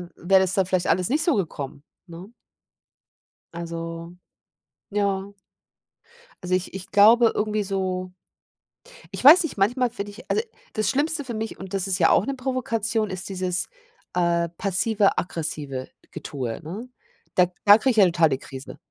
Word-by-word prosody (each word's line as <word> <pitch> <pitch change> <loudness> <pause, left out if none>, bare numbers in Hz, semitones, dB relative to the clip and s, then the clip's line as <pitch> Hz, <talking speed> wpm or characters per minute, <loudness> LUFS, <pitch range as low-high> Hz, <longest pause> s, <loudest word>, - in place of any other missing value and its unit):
wäre 190 +2 +3
das 190 -1 0
dann 195 -1 +2
vielleicht 185 -1 0
alles 180 0 +1
nicht 300 +5 +1
so 335 - +2
gekommen, 145 -7 -4 0.2
ne? 170 +3 -10 1.3
Also, 165 0 -7 0.7
ja. 200 -1 -1 1.1
Also, 180 0 +1
ich 185 0 -3
ich 190 -1 -8
glaube 225 +3 +6
irgendwie 215 0 -1
so 185 -2 -3 1.0
ich - - -6
weiß 310 +7 +9
nicht, 325 - -5
manchmal 245 +6 +2
finde 205 -3 -6
ich 210 +4 -14
also, 440 - +1 0.3
das 215 -3 -1
Schlimmste 290 +3 +1
für 245 - -5
mich, 220 0 -5
und 190 0 -9
das 195 0 0
ist 190 -2 +1
ja 165 -4 +4
auch 195 - +3
'ne 275 - -2
Provokation, 230 -4 -1
ist 185 0 -4
dieses, 185 -1 -1 0.5
äh, 170 -1 +1
passive, 200 +1 +1
aggressive 150 -6 -4 0.2
Getue, 125 -6 -5
ne? 195 +10 -8 0.4
Da 180 -1 +4 0.2
da 205 +1 +9
kriege 260 +3 +2
ich 225 - -4
ja 200 - +7
total 165 -2 +3
die 135 - 0
Krise, 135 0 -10
190 Hz, 160 wpm, -24 LUFS, 175-220 Hz, 1.3 s, weiß